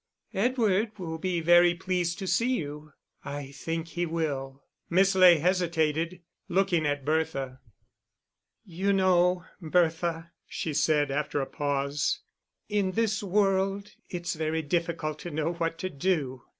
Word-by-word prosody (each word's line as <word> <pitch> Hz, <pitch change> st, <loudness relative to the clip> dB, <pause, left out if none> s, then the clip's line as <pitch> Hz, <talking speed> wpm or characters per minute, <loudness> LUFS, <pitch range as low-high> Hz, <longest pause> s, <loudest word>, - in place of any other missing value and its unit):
"Edward 215 Hz, -1 st, +1 dB
will 165 Hz, -4 st, -5 dB
be 175 Hz, -1 st, -1 dB
very 175 Hz, +1 st, +6 dB
pleased 175 Hz, -1 st, -1 dB
to 195 Hz, -, -5 dB
see 240 Hz, +7 st, +2 dB
you." 150 Hz, 0 st, -6 dB, 0.3 s
"I 140 Hz, -1 st, -6 dB
think 165 Hz, +3 st, -4 dB
he 175 Hz, +2 st, -2 dB
will." 140 Hz, -4 st, -3 dB, 0.3 s
Miss 190 Hz, +3 st, +4 dB
Ley 185 Hz, -2 st, +7 dB
hesitated, 170 Hz, 0 st, 0 dB, 0.3 s
looking 180 Hz, -4 st, +2 dB
at 145 Hz, -2 st, -2 dB
Bertha. 145 Hz, -4 st, -1 dB, 1.1 s
"You 190 Hz, +3 st, 0 dB
know, 180 Hz, -1 st, +3 dB, 0.2 s
Bertha," 165 Hz, 0 st, 0 dB, 0.2 s
she 160 Hz, -, -4 dB
said, 150 Hz, -1 st, +2 dB
after 145 Hz, +1 st, -1 dB
a 135 Hz, -, -1 dB
pause, 140 Hz, 0 st, -1 dB, 0.5 s
"in 200 Hz, -3 st, 0 dB
this 220 Hz, -1 st, +1 dB
world 195 Hz, 0 st, +1 dB, 0.2 s
it's 175 Hz, -1 st, -3 dB
very 160 Hz, 0 st, -1 dB
difficult 160 Hz, -1 st, -2 dB
to 175 Hz, -, -6 dB
know 155 Hz, +2 st, -1 dB
what 165 Hz, -1 st, -2 dB
to 185 Hz, +3 st, -3 dB
do. 140 Hz, -5 st, -1 dB
170 Hz, 135 wpm, -28 LUFS, 155-185 Hz, 1.1 s, Ley